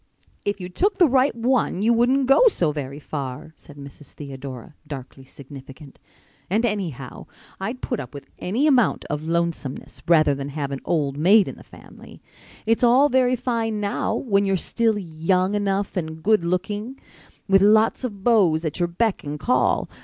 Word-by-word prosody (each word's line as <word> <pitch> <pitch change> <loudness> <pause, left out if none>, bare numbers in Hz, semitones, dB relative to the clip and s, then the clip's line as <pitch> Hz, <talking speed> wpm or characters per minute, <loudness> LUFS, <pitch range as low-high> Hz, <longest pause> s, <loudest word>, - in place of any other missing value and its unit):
"If 205 0 -1
you 180 - -6
took 390 - 0
the 350 - +6
right 265 0 +2
one 235 -5 0
you 235 +2 +4
wouldn't 255 +4 +2
go 275 - +5
so 170 - +1
very 140 -2 -6
far," 145 +1 -6
said 145 - -15
Mrs. 140 +1 -12
Theodora, 135 -3 -9
darkly 135 -2 -9
significant. 135 +1 -13 0.5
"And, 215 +6 +1
anyhow, 170 - -4 0.3
I'd 225 +7 -5
put 245 - -2
up 125 - -7
with 140 -1 -10
any 230 +11 0
amount 260 -7 +2
of 150 0 -2
lonesomeness 165 -5 -3
rather 155 -4 +4
than 140 0 -5
have 140 -1 -4
an 135 - -4
old 145 -5 -1
maid 195 +5 +5
in - - -5
the - - -15
family. - - -15 0.5
It's 225 +2 +1
all 255 +4 +5
very 255 -1 +3
fine 230 -3 -2
now, 205 +2 -1
when 200 -5 +1
you're 195 -1 +1
still 225 +4 0
young 185 +2 0
enough 200 -1 -1
and 160 -3 -5
good 215 -3 +3
looking, 205 +8 -3 0.5
with 195 -1 +4
lots 215 +5 +4
of 205 -6 -5
beaus 185 -9 +3
at 155 +3 -3
your 175 - +1
beck 200 +5 -1
and 150 +1 -5
call. 250 - +1
190 Hz, 175 wpm, -23 LUFS, 150-230 Hz, 0.5 s, the